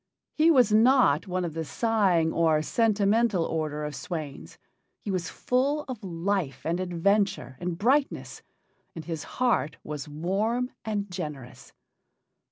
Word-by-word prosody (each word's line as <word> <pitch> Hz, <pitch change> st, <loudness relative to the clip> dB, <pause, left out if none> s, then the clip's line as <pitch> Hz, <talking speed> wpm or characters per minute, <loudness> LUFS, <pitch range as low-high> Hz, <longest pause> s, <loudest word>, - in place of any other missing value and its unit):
He 320 Hz, +2 st, +4 dB
was 255 Hz, -9 st, +5 dB
not 220 Hz, -, +4 dB
one 185 Hz, -1 st, -1 dB
of 165 Hz, -, -4 dB
the 165 Hz, 0 st, -3 dB
sighing 190 Hz, -5 st, +1 dB
or 160 Hz, -2 st, +2 dB
sentimental 215 Hz, -1 st, +2 dB
order 155 Hz, -2 st, -2 dB
of 150 Hz, -, -5 dB
swains; 155 Hz, -5 st, -6 dB, 0.4 s
he 205 Hz, -, -5 dB
was 180 Hz, -3 st, -2 dB
full 280 Hz, +4 st, 0 dB
of 245 Hz, -5 st, -7 dB
life 175 Hz, -3 st, -2 dB
and 170 Hz, +2 st, 0 dB
adventure 185 Hz, -3 st, 0 dB
and 175 Hz, -1 st, -3 dB
brightness, 270 Hz, +8 st, 0 dB, 0.5 s
and 165 Hz, -, -7 dB
his 165 Hz, -3 st, -4 dB
heart 225 Hz, -, +1 dB
was 150 Hz, 0 st, -6 dB
warm 205 Hz, -, -1 dB
and 205 Hz, -3 st, -3 dB
generous. 150 Hz, -8 st, -7 dB
185 Hz, 135 wpm, -27 LUFS, 160-225 Hz, 0.5 s, was